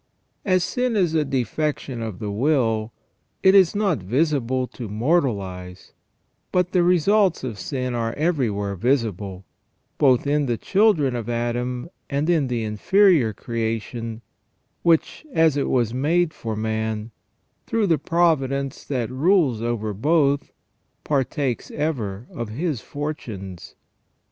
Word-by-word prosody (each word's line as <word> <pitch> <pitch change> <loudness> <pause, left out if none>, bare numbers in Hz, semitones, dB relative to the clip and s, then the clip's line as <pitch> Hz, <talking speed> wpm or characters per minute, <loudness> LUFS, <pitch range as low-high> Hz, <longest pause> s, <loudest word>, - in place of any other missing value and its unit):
As 185 -3 +2
sin 250 +3 -1
is 180 -6 +2
a 155 -2 +3
defection 135 -1 -2
of 110 -5 -5
the 105 +1 -4
will, 115 -2 +1 0.5
it 190 - +6
is 195 -1 +5
not 200 - +1
visible 130 - 0
to 115 -4 -7
mortal 125 - +1
eyes; 90 -1 -9 0.6
but 180 0 +1
the 180 - +3
results 180 +1 +3
of 115 -6 -5
sin 130 -3 -3
are 115 -1 -1
everywhere 115 - 0
visible, 100 -5 -1 0.5
both 130 -3 +4
in 145 0 +1
the 120 -2 0
children 185 - +2
of 120 -1 -4
Adam 120 +2 -2 0.2
and 145 +4 +1
in 155 -6 +2
the 120 -2 -2
inferior 140 - +3
creation, 115 +1 -4 0.6
which, 165 - +2
as 160 -5 +4
it 140 - 0
was 120 -3 +1
made 155 +5 +1
for 110 -2 -5
man, 110 0 -2 0.6
through 225 -3 +1
the 165 -6 +2
providence 140 -5 +1
that 125 -4 -2
rules 140 - +2
over 115 -3 -2
both, 145 - +1 0.5
partakes 135 -2 -1
ever 120 -9 -3
of 115 -2 -5
his 140 +2 -2
fortunes. 110 - -6
130 Hz, 130 wpm, -23 LUFS, 115-160 Hz, 0.6 s, it